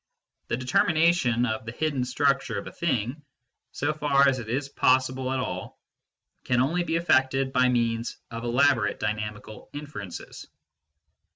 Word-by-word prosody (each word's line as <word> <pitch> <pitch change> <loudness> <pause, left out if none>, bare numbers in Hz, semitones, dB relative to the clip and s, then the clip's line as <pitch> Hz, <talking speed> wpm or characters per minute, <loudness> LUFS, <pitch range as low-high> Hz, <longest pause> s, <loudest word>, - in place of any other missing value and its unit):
The - - -1
determination 130 -1 +2
of 110 -1 -3
the - - -3
hidden 145 0 -1
structure 135 -4 +1
of 100 - -5
a - - -7
thing, 130 -3 -2 0.5
so 145 +2 -1
far 140 -2 +3
as 130 -1 +2
it 110 -2 -7
is 135 +4 -1
possible 130 -1 +1
at 130 - 0
all, - - -5 0.6
can 125 -1 +1
only 165 +8 +1
be 165 -1 -1
effected 135 -5 +2
by 125 0 +4
means 115 -1 0
of 115 0 -6
elaborate 120 -3 +2
dynamical 105 0 -5
inferences. 145 - -8
130 Hz, 145 wpm, -26 LUFS, 115-145 Hz, 0.6 s, by